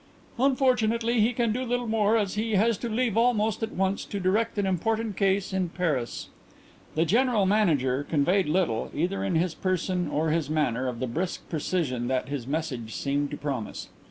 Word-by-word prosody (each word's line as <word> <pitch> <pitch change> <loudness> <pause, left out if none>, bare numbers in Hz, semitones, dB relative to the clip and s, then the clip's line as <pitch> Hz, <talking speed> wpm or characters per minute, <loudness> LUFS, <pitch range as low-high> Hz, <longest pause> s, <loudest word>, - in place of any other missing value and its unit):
"Unfortunately 245 -4 +2
he 225 +3 +3
can 235 -2 0
do 250 +3 -2
little 245 0 -1
more 220 -1 +2
as 200 -3 0
he 220 +1 -1
has 225 +4 +3
to 235 - -3
leave 230 -1 0
almost 225 -3 +2
at 225 - -2
once 190 +1 0
to 200 - -5
direct 210 +5 +1
an 205 - +1
important 215 +3 -1
case 195 -1 +1
in 185 -2 0
Paris." 155 -9 -2 0.7
The 160 +2 +2
General 230 +1 +3
Manager 150 -10 +2
conveyed 170 +6 +1
little, 160 -9 0
either 180 +6 -1
in 180 - 0
his 170 +1 +1
person 185 +1 -1
or 155 +1 0
his 160 -3 0
manner, 130 -5 0
of 120 -2 -4
the - - +1
brisk 170 +9 -3
precision 150 -7 -1
that 130 0 -1
his 140 -4 -4
message 135 -7 -3
seemed 145 +1 -1
to 145 - -5
promise. 135 -7 -4
185 Hz, 185 wpm, -27 LUFS, 150-220 Hz, 0.7 s, he